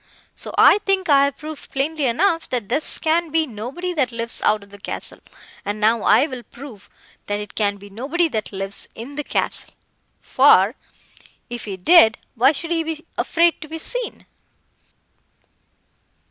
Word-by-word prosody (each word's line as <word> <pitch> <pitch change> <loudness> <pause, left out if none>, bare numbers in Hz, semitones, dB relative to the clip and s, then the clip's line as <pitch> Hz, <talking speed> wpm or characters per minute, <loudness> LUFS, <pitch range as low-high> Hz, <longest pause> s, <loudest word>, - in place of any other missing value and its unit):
So - - -4
I - - +7
think 385 -3 0
I 280 -1 +6
have 280 - -3
proved 310 -1 -9
plainly 285 +1 -1
enough, 330 +7 +1
that 240 -5 -3
this 285 +6 +1
can 330 +1 +1
be 320 +1 +2
nobody 270 - -5
that 270 -7 0
lives 230 0 -4
out 210 -1 +2
of 200 - -18
the 205 - -13
castle; - - -5 0.4
and 205 +1 -4
now 220 +1 +3
I 275 - +4
will 260 -5 -7
prove, 240 -4 -13 0.4
that 205 0 -1
it 210 -1 -8
can 205 -2 0
be 200 0 -14
nobody 285 - 0
that 220 -6 -3
lives 195 0 -6
in 240 +6 -8
the 295 +1 -4
castle—for, 240 -6 +1 0.8
if 240 -1 -5
he 195 -3 -5
did—why 245 - +4
should 330 +3 -5
he 330 -1 +1
be 320 0 -5
afraid 335 0 +2
to 310 - -8
be 320 +1 -6
seen? - - -4
270 Hz, 160 wpm, -21 LUFS, 215-320 Hz, 0.8 s, I